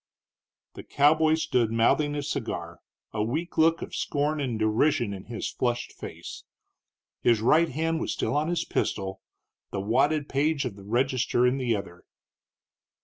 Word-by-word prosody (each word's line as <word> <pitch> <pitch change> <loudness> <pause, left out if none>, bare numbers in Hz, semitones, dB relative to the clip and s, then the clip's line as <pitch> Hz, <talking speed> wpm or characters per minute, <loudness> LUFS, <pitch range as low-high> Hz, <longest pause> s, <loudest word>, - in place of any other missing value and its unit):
The - - -8
cowboy 155 +2 +3
stood 125 -8 +1
mouthing 145 +6 +2
his 145 -1 -3
cigar, 85 - -4 0.3
a 110 - -1
weak 155 +10 -3
look 165 +1 +4
of - - -9
scorn 150 +1 -1
and 125 -5 -2
derision 110 +1 +1
in 95 -1 -8
his 115 -1 -4
flushed 120 -1 -1
face. - - -9 0.8
His 115 -2 +4
right 155 +9 +4
hand 160 +3 -1
was - - -2
still 110 - -1
on 150 +1 +1
his 175 0 -1
pistol, 95 -1 -2 0.5
the 100 - -3
wadded 140 +9 +1
page 145 +1 0
of 120 -6 -4
the 100 -1 -13
register 125 +2 +1
in 125 +2 +2
the 120 -3 +1
other. 90 -3 -8
130 Hz, 155 wpm, -27 LUFS, 110-150 Hz, 0.8 s, look